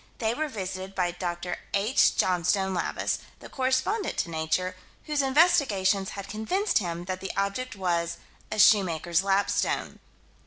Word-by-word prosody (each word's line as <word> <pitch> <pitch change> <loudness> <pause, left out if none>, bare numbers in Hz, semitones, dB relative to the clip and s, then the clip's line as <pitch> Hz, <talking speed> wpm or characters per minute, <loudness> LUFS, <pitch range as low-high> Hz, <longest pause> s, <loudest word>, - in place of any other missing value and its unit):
They 225 -1 0
were 310 +5 -2
visited 190 -5 -6
by 180 -2 +1
Dr. 175 0 -4 0.2
H. 215 +7 +3
Johnstone 190 +2 +1
Lavis, 175 - -1 0.2
the - - -11
correspondent 265 +11 0
to 170 - -1
Nature, 165 +3 -1 0.3
whose 300 -1 0
investigations 260 - +3
had 200 - -6
convinced 295 - 0
him 175 -2 -4
that 185 0 -4
the 190 - -4
object 200 +6 -2
was 170 -3 -1 0.3
a 215 - -3
"shoemaker's 185 -5 +4
lapstone." 195 +1 0
195 Hz, 140 wpm, -27 LUFS, 180-245 Hz, 0.3 s, shoemaker's